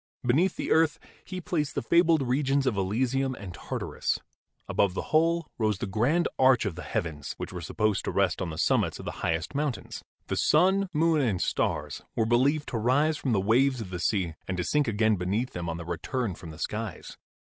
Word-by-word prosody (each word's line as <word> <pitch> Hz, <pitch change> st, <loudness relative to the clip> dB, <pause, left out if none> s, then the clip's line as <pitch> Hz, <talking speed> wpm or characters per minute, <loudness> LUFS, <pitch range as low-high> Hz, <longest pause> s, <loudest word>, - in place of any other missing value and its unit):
Beneath 160 Hz, +10 st, +3 dB
the -, -, -3 dB
earth 160 Hz, 0 st, +4 dB, 0.3 s
he 185 Hz, 0 st, -6 dB
placed 160 Hz, -6 st, -2 dB
the -, -, -1 dB
fabled 170 Hz, -3 st, +4 dB
regions 135 Hz, +2 st, +1 dB
of 130 Hz, -5 st, +1 dB
Elysium 130 Hz, +7 st, 0 dB
and 100 Hz, -6 st, -8 dB
Tartarus; -, -, -3 dB, 0.5 s
above 95 Hz, -2 st, +1 dB
the -, -, -4 dB
whole 165 Hz, +1 st, +3 dB
rose 110 Hz, -3 st, +1 dB
the -, -, -3 dB
grand 120 Hz, -, +1 dB
arch 130 Hz, -3 st, +5 dB
of 100 Hz, -, -1 dB
the 90 Hz, -, -8 dB
heavens, 75 Hz, -6 st, -4 dB
which -, -, -6 dB
were 90 Hz, -, -5 dB
supposed 105 Hz, +4 st, 0 dB
to -, -, -1 dB
rest 95 Hz, -4 st, +1 dB
on 90 Hz, -, -2 dB
the 80 Hz, -, -6 dB
summits -, -, +1 dB
of -, -, -9 dB
the -, -, -3 dB
highest 80 Hz, -, -1 dB
mountains. 145 Hz, -2 st, -3 dB, 0.2 s
The -, -, -3 dB
sun, 190 Hz, +5 st, +3 dB
moon 160 Hz, -1 st, +3 dB
and 110 Hz, -9 st, +1 dB
stars 75 Hz, -3 st, -1 dB
were 115 Hz, -, +2 dB
believed 135 Hz, +6 st, +2 dB
to 115 Hz, -, -2 dB
rise 145 Hz, +7 st, +2 dB
from 135 Hz, -3 st, -2 dB
the 100 Hz, -, +3 dB
waves 125 Hz, +6 st, +3 dB
of 100 Hz, -5 st, -6 dB
the 90 Hz, -, -4 dB
sea 95 Hz, -4 st, 0 dB
and 95 Hz, -, -2 dB
to 90 Hz, -, 0 dB
sink 150 Hz, +5 st, +1 dB
again 110 Hz, -1 st, +2 dB
beneath 100 Hz, +8 st, -1 dB
them 85 Hz, -1 st, -4 dB
on 80 Hz, -, -3 dB
their 85 Hz, -, -7 dB
return 95 Hz, -, -2 dB
from 85 Hz, 0 st, -10 dB
the 80 Hz, -, -10 dB
skies. 105 Hz, +4 st, -5 dB
120 Hz, 210 wpm, -28 LUFS, 95-145 Hz, 0.5 s, arch